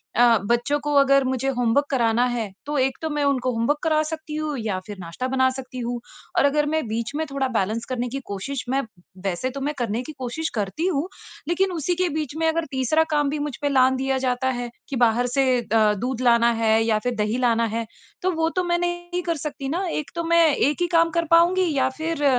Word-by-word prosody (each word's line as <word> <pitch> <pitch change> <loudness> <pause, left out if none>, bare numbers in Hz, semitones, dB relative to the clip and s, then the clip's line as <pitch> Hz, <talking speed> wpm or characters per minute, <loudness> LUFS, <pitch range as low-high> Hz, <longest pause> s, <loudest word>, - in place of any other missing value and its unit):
अ, 235 -1 +6
बच्चों 240 +6 +1
को 295 0 -2
अगर 275 0 +4
मुझे 260 0 -1
होमवर्क 245 +4 +2
कराना 235 -2 +2
है 235 -5 -2
तो 295 0 -2
एक 265 0 +1
तो 320 - -2
मैं 295 -1 -1
उनको 255 -3 +1
होमवर्क 235 +6 +1
करा 310 -1 +3
सकती 315 -1 -6
हूँ 305 -2 -2
या 205 -4 -2
फिर 205 -2 -8
नाश्ता 175 +9 -4
बना 260 0 +2
सकती 255 -1 -7
हूँ 240 0 -3 0.4
और - - +5
अगर 295 +1 +2
मैं 315 +1 0
बीच 225 +2 -3
में 315 +1 -1
थोड़ा 270 -1 0
बैलेंस 225 -1 -1
करने 250 -1 -2
की 275 +3 -4
कोशिश 245 +7 -4
मैं 270 +1 +1 0.4
वैसे 195 +8 -1
तो - - -4
मैं 295 +2 -1
करने 230 0 -1
की 310 - -8
कोशिश 285 +6 -3
करती 220 - -1
हूँ 320 -1 0 0.4
लेकिन 370 +2 +1
उसी 345 +1 -1
के 365 0 +1
बीच 305 -2 -3
में 325 0 +1
अगर 325 0 0
तीसरा 265 +5 +2
काम 295 -2 +2
भी 295 +1 -2
मुझ 290 -3 -3
पे 285 - +1
लाँघ 260 -1 +4
दिया 265 0 0
जाता 255 +1 0
है 240 -1 -4 0.2
कि 275 - -3
बाहर 240 0 +3
से 270 -1 +3 0.2
अ, 215 -2 +3
दूध 250 +4 -3
लाना 235 -1 +4
है 220 0 +4
या 220 -1 +2
फिर 245 +1 -2
दही 215 +3 0
लाना 230 -1 +3
है। 230 0 -1 0.4
तो 370 +1 +1
वो 325 -1 0
तो 365 - +1
मैं 345 0 +1
नहीं 350 0 -2
कर 335 -1 -1
सकती 285 -2 -4
ना 360 +5 -1
एक 300 - -4
तो 335 - -2
मैं 335 -1 +6
एक 295 +5 +1
ही 350 - +2
काम 330 0 +4
कर 335 - 0
पाऊँगी 350 0 +4
या 260 -1 +2
फिर 320 -3 -1
270 Hz, 235 wpm, -23 LUFS, 235-310 Hz, 0.4 s, अ